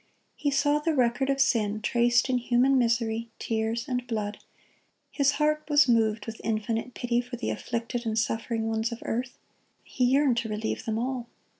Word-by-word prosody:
He 290 - -1
saw 290 +1 +2
the 315 +1 0
record 255 +1 +1
of 275 0 +1
sin 220 -6 +2
traced 240 +2 +2
in 255 -1 +1
human 250 +2 +3
misery, 230 -1 0
tears, 225 +2 -2
and 250 -2 -2
blood; 210 -3 -3 0.7
His 280 -1 +2
heart 305 +1 +1
was 290 -2 +5
moved 220 -3 +2
with 225 -1 -7
infinite 225 +2 -2
pity 240 0 0
for 245 0 -7
the 245 - -3
afflicted 235 0 -3
and 220 0 -1
suffering 225 +1 -1
ones 225 +1 -1
of 235 - -7
earth; 245 +2 -3 0.5
He 250 - -1
yearned 265 -1 +3
to 235 -2 -1
relieve 215 +1 -3
them 220 -1 -1
all. 245 0 -3
235 Hz, 175 wpm, -27 LUFS, 225-260 Hz, 0.7 s, was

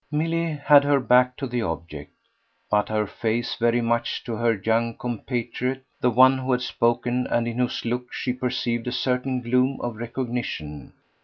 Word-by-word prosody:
Milly 165 +2 0
had 145 -1 +5
her 145 -1 +3
back 125 0 +3
to 140 - -3
the 120 -2 -2
object, 80 -6 -5 0.6
but 105 0 +2
her 110 0 0
face 115 +3 -2
very 120 +1 +2
much 115 0 -1
to 120 - -5
her 115 +1 +2
young 115 +3 0
compatriot, 125 +2 -3 0.2
the 125 - +2
one 130 +2 +5
who 130 0 -2
had 125 - 0
spoken 120 +1 0
and 120 0 0
in 120 +1 -3
whose 125 -1 -1
look 125 +1 -3
she 125 - -2
perceived 125 -2 -2
a - - -1
certain 125 0 -1
gloom 125 +3 +1
of 120 -2 -4
recognition. 120 - -5
120 Hz, 170 wpm, -24 LUFS, 115-125 Hz, 0.6 s, had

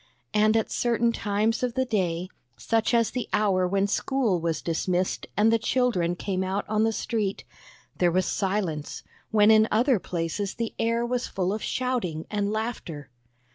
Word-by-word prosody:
And 215 +1 +4
at 220 - -1
certain 235 -1 +1
times 215 +1 0
of 250 -2 -1
the 260 0 +1
day, 180 -6 -1 0.3
such 225 - 0
as 230 -2 +2
the 250 -2 -4
hour 190 -3 +2
when 195 +1 +1
school 220 -2 0
was 165 -1 -2
dismissed 180 +2 -1
and 220 +2 +4
the 230 - +3
children 220 -9 +1
came 190 +1 -2
out 190 +2 -2
on 215 0 +1
the 225 - +2
street, 215 -3 -2 0.5
there 175 -1 +3
was 185 +1 +1
silence, 185 -7 -2 0.3
when 215 -1 +5
in 220 0 +6
other 240 +1 +3
places 175 +4 -3
the 230 -1 -3
air 230 +1 +1
was 250 0 -1
full 185 0 -1
of 215 - -4
shouting 235 -12 -2
and 205 -1 0
laughter. 215 - -4
210 Hz, 170 wpm, -26 LUFS, 185-230 Hz, 0.5 s, in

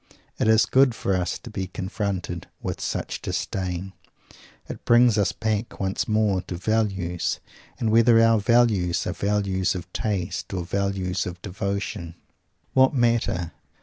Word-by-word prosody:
It - - +2
is 110 0 +5
good 130 -2 +4
for 100 -3 0
us 90 -1 -1
to 120 - -11
be 95 -3 -3
confronted 95 -2 -4
with - - -4
such - - -3
Disdain. 95 0 -3 0.7
It - - -8
brings 120 -1 +5
us 105 -2 +2
back 110 0 -2
once 95 0 -1
more 105 -3 +2
to 90 - -7
"Values"; 95 -3 -1 0.4
and 110 -2 +1
whether 115 +1 +6
our 115 -1 +5
"Values" 105 -6 +2
are 90 - -2
values 100 -2 0
of 90 -1 -7
taste 100 -4 -2
or 90 -2 -3
values 95 -1 -1
of 90 0 -6
devotion 100 -3 -4 0.6
what 130 +2 +4
matter? 115 -8 +1
100 Hz, 145 wpm, -24 LUFS, 90-110 Hz, 0.7 s, whether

